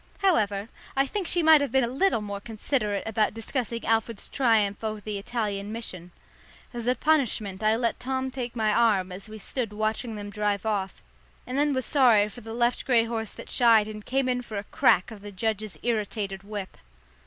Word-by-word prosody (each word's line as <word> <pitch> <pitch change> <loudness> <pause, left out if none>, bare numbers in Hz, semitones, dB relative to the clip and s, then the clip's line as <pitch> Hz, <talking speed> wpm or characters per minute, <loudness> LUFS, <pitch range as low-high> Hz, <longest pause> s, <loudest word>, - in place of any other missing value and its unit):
However, 210 - +2 0.3
I 270 0 +3
think 375 +5 -3
she 350 -2 +2
might 315 -2 +7
have 285 - -1
been 265 -1 +3
a - - +1
little 270 - +1
more 200 -1 -5
considerate 215 -1 -1
about 220 -1 +1
discussing 235 0 -3
Alfred's 225 -1 0
triumph 220 -6 +2
over 215 -1 -2
the 205 -1 -4
Italian 205 -2 -3
mission. 185 -6 -6 0.6
As 240 -1 -5
a 250 - +3
punishment 240 -12 +1
I 215 +1 +3
let 235 0 -1
Tom 260 +1 -2
take 245 -2 -5
my 215 -2 +2
arm 205 -6 +3
as 190 +3 -8
we 215 - -8
stood 225 +1 -3
watching 215 +2 -2
them 205 -1 -6
drive 205 -1 -1
off, 200 -3 -2 0.4
and 250 - -5
then 290 +1 +2
was 260 -2 0
sorry 235 -7 +5
for 240 - -10
the 225 0 -9
left 240 +1 +1
grey 240 -3 +4
horse 225 -2 -3
that - - -10
shied 225 -3 +5
and 215 -1 -7
came 265 +2 0
in 250 -1 0
for 220 -4 -7
a 200 - -3
crack 185 0 +3
of 215 -2 -10
the 205 0 -8
judge's 215 -2 -2
irritated 210 -4 -2
whip. 200 -1 -7
225 Hz, 200 wpm, -26 LUFS, 205-245 Hz, 0.6 s, might